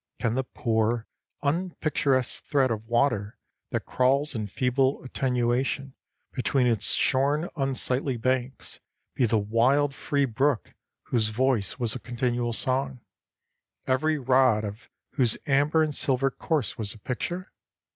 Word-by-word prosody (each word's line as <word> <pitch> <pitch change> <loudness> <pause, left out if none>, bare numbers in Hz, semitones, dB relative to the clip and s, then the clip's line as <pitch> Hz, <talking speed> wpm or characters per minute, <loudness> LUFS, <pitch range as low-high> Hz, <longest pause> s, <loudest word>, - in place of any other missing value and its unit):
Can 115 - 0
the 130 +2 0
poor, 115 -2 -1 0.4
unpicturesque 145 -5 0
thread 135 -4 +2
of 110 0 -4
water 120 -3 +1 0.3
that - - -3
crawls 135 +4 +2
in 110 -4 -3
feeble 130 +5 0
attenuation 130 +1 -1 0.4
between 130 0 +1
its 115 -3 +2
shorn, 145 +5 +2
unsightly 135 -2 0
banks 130 +1 -2 0.3
be 125 - +2
the 110 - +2
wild, 125 +7 +2
free 140 0 0
brook 130 +1 0 0.3
whose 115 -3 0
voice 120 -3 0
was 120 -4 -1
a - - -5
continual 120 -1 -2
song, 130 +2 -1 0.8
every 155 +4 +1
rod 130 -4 +3
of 105 +5 -7 0.2
whose 125 -6 +2
amber 145 +3 +3
and 155 -1 -1
silver 135 -1 +1
course 150 -4 -2
was 105 -2 -1
a - - -12
picture? 175 - -4
130 Hz, 130 wpm, -26 LUFS, 120-140 Hz, 0.8 s, rod